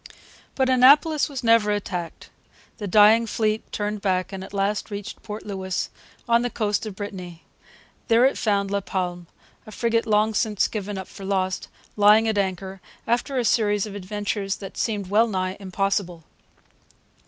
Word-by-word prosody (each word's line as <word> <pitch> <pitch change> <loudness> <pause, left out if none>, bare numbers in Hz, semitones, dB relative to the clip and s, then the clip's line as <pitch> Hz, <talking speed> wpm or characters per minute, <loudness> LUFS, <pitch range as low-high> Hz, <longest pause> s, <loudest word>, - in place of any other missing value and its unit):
But 265 -1 +2
Annapolis 285 +5 +5
was 275 -3 -6
never 230 -2 +4
attacked. 180 -5 -4 0.5
The 205 - -4
dying 215 +4 +6
fleet 215 0 -1
turned 210 0 -3
back 185 -2 -1
and 190 -1 -5
at - - -10
last 200 +2 -1
reached 205 -1 -7
Port 210 0 -7
Louis, 190 -2 -3 0.4
on 235 0 +4
the 245 - -1
coast 210 -1 -1
of 205 - -7
Brittany. 180 -4 -7 0.6
There 230 +2 +5
it 270 - +2
found 200 -2 0
La 200 0 0
Palme, 180 -2 -4 0.4
a - - -9
frigate 230 +1 0
long 215 +1 +2
since 210 -1 +1
given 205 -2 -5
up 190 - -6
for 195 - -11
lost, 190 -1 -1 0.3
lying 210 +2 +5
at 215 -2 +1
anchor, 190 0 -3 0.2
after 245 +3 0
a 245 - +1
series 210 -2 +2
of 210 - -8
adventures 200 0 -3
that 195 -2 -9
seem 210 -3 -1
wellnigh 195 -3 +1
impossible. 190 -3 -2
205 Hz, 160 wpm, -24 LUFS, 190-220 Hz, 0.6 s, dying